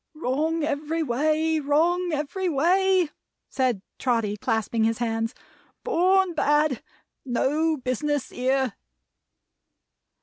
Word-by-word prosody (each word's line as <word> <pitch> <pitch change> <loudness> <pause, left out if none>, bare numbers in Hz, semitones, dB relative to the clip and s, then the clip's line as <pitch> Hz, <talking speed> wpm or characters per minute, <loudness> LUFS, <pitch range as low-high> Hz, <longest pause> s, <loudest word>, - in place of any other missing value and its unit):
"Wrong 310 +3 -1
every 305 +2 -1
way. 310 +4 +1
Wrong 335 +5 +1
every 310 +5 -2
way!" 360 +3 +2 0.4
said 250 -7 0 0.2
Trotty 230 -5 0
clasping 220 0 -1
his 225 0 +1
hands. 225 -1 -2 0.5
"Born 375 +1 +3
bad. 295 -4 +2 0.4
No 300 +6 +1
business 260 +1 -2
here!" 260 -2 0
290 Hz, 95 wpm, -25 LUFS, 250-320 Hz, 0.5 s, Born